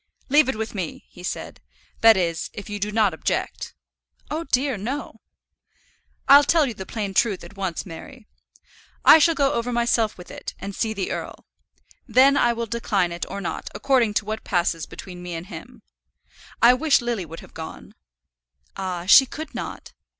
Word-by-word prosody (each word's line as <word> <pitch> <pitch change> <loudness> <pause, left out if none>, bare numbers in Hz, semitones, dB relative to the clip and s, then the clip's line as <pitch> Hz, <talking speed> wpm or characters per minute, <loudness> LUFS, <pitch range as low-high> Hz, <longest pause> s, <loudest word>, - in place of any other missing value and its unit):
"Leave 290 0 +5
it 265 - -1
with 220 +1 -4
me," 185 -6 -5
he 180 - -13
said; 180 - -6 0.4
"that 225 -2 +7
is, 170 -3 -1
if 205 0 -8
you 205 - -4
do 205 +1 -2
not 210 -4 +2
object." 160 - -3 0.6
"Oh 320 +2 -3
dear, 270 0 +1
no!" 245 +9 -5 1.1
"I'll 285 +1 +9
tell 315 +1 +3
you 245 - -3
the 190 -3 -9
plain 205 -4 -4
truth 205 -1 +1
at 205 - -12
once, 190 -4 -3
Mary. 210 +8 -11 0.8
I 320 - +9
shall 330 +1 +4
go 275 -2 +2
over 235 +1 -2
myself 235 -2 +1
with 180 - -11
it, - - -7
and 200 - -7
see 220 +2 -1
the 195 -2 -3
earl. - - -6 0.6
Then 270 +2 +5
I 240 -4 +3
will 235 0 -3
decline 205 -6 -1
it 170 0 -4
or 200 +1 -5
not, 175 - -5
according 230 -1 +2
to 210 - +1
what 220 +1 -4
passes 170 -3 -1
between 180 -2 -10
me 175 -1 -6
and 165 +1 -6
him. - - -11 0.8
I 240 +1 +8
wish 295 +3 +3
Lily 240 -5 -2
would 165 +2 -9
have - - -16
gone." 160 -1 -9 0.8
"Ah! 180 -3 -4
she 265 +7 +8
could 315 +5 -8
not." - - -7
215 Hz, 180 wpm, -23 LUFS, 185-255 Hz, 1.1 s, I'll